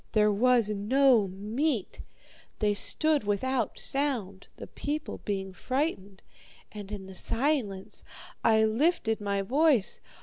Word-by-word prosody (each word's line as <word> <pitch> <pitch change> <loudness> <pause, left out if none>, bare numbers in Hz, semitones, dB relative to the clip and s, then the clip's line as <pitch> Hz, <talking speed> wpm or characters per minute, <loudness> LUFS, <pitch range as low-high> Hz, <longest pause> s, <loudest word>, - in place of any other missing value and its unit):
There 210 -1 +4
was 235 +1 +3
no 230 +2 +3
meat. 215 +6 -2 0.6
They 210 -1 +1
stood 305 +7 +2
without 235 +6 -1
sound, 240 -9 -2
the - - -8
people 300 +1 -5
being 195 -2 -3
frightened, 205 - -3 0.5
and 205 -1 -9
in 200 -2 -6
the 190 - -10
silence 225 - -2 0.4
I 220 -1 +4
lifted 225 -1 +1
my 200 -1 -1
voice. 265 -1 +2
220 Hz, 115 wpm, -28 LUFS, 200-270 Hz, 0.6 s, There